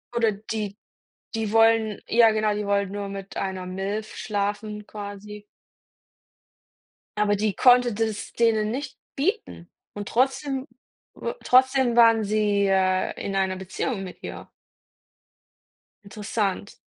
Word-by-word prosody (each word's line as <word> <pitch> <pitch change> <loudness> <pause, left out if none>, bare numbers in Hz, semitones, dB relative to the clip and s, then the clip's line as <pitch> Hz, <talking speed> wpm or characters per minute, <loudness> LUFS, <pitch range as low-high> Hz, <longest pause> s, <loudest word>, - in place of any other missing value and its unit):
Oder 230 -2 +3
die 210 0 -5 0.6
die 220 -2 -2
wollen 225 -1 +3
ja 230 -1 +5
genau, 215 -1 +1
die 210 0 -3
wollen 200 -1 0
nur 200 0 -4
mit 195 0 -7
einer 190 -1 -3
Milf 195 +4 -4
schlafen 210 0 -3
quasi. 205 0 -8 1.7
Aber 210 0 +2
die 210 0 0
konnte 245 -2 +5
das 220 -1 -3
denen 220 -2 +2
nicht 275 +4 -5 0.2
bieten 325 - -2 0.2
und 205 -1 -6
trotzdem 270 +2 0 0.5
u 470 - -4
trotzdem 260 -1 +4
waren 230 -2 +6
sie, 205 -1 +1
äh, 185 -1 +2
in 195 - -3
einer 190 -1 0
Beziehung 195 +3 -3
mit 185 - -10
ihr. - - -8 1.5
Interessant. 205 -1 -3
210 Hz, 120 wpm, -25 LUFS, 200-225 Hz, 1.7 s, waren